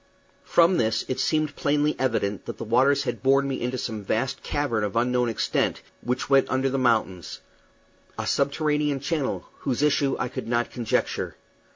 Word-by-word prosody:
From 170 +1 +4
this 110 -1 +1
it 130 - -2
seemed 155 -2 0
plainly 150 +1 +1
evident 105 -6 -1
that - - -5
the - - -5
waters 130 +5 +3
had - - -3
borne 135 +1 +3
me 135 -1 -3
into 125 +1 -2
some 110 -4 -4
vast 125 +6 -1
cavern 130 -7 -1
of 105 0 -3
unknown 125 +1 +2
extent, 115 - -1 0.2
which 125 +1 -2
went 135 -1 +4
under 130 +1 +1
the 135 - 0
mountains 110 -8 0 0.8
a - - -3
subterranean 150 0 +1
channel, 145 -1 -2
whose 135 +1 -1
issue 140 -2 +2
I - - -1
could 125 - -6
not 120 0 0
conjecture. 120 -3 -1
130 Hz, 170 wpm, -25 LUFS, 120-140 Hz, 0.8 s, From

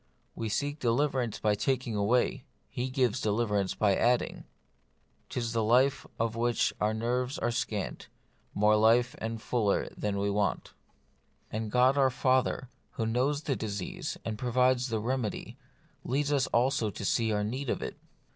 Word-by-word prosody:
We 115 -1 -4
seek 145 +7 -2
deliverance 125 -2 0
by 105 -1 +1
taking 125 +1 -1
away; 105 +5 +1 0.3
He 125 +2 -2
gives 130 -3 +1
deliverance 105 -2 0
by 100 -3 +3
adding; 120 +4 +1 0.4
" - - -18
'lis 115 -2 -2
life 120 +5 +3
of 115 0 0
which 120 0 +1
our 105 +1 +2
nerves 125 +4 -1
are - - 0
scant, 105 -4 -3 0.5
More 105 +1 +4
life 115 +3 +4
and 115 0 -3
fuller 110 -2 0
that 105 -1 -2
we 100 +1 0
want 100 0 0
j" - - -17 0.9
and 110 -1 -3
God 130 +3 +4
our 135 -1 +5
Father, 130 0 +1 0.3
who 115 - -2
knows 130 +6 0
our 140 - +2
disease 100 -6 -4
and 110 -1 -3
provides 125 +1 +2
the 110 -2 -1
remedy, 120 -1 -3 0.4
leads 140 +3 0
us 140 -2 +2
also 120 -2 +1
to 100 - -6
see 115 +3 +1
our 105 -1 0
need 130 +5 -3
of - - -1
it. - - -5
120 Hz, 160 wpm, -30 LUFS, 110-130 Hz, 0.9 s, our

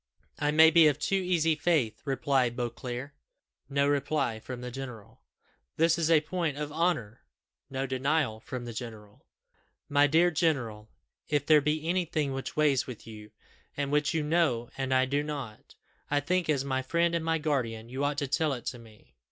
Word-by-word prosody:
"I 145 - +1
may 160 +2 +7
be 165 -1 +7
of 145 - +2
too 160 +6 -2
easy 175 -4 +2
faith," 150 -7 0
replied 135 -3 +1
Beauclerc. 125 +2 -4 0.6
[No 140 0 +2
reply.] 140 -5 0 1.4
"This 165 +1 +3
is 165 -1 +1
a 160 -2 +5
point 155 -2 -2
of 150 0 -4
honour." 155 -9 -1 0.5
[No 135 0 -2
denial.] 130 -3 0 1.5
"My 145 0 +4
dear 165 +4 +4
general, 120 -10 -1 0.4
if 145 -1 +1
there 155 -1 +6
be 150 +2 -1
anything 165 -5 0
which 135 0 -5
weighs 145 -4 +3
with 125 -4 -9
you, 105 -1 -10 0.5
and 140 -1 -2
which 150 +1 +1
you 155 - +1
know 150 -7 +1
and 135 -1 -3
I 130 0 +4
do 140 +2 0
not, 140 -8 -7 0.3
I 145 - +2
think, 175 +3 -1
as 140 -3 +1
my 130 -1 0
friend 170 +5 +1
and 170 -1 0
my 165 0 +1
guardian, 125 -8 -2
you 130 +3 -4
ought 145 0 0
to 145 -1 -1
tell 150 +2 +1
it 125 - -7
to 120 - -4
me." 110 -2 -18
145 Hz, 165 wpm, -29 LUFS, 130-160 Hz, 1.5 s, may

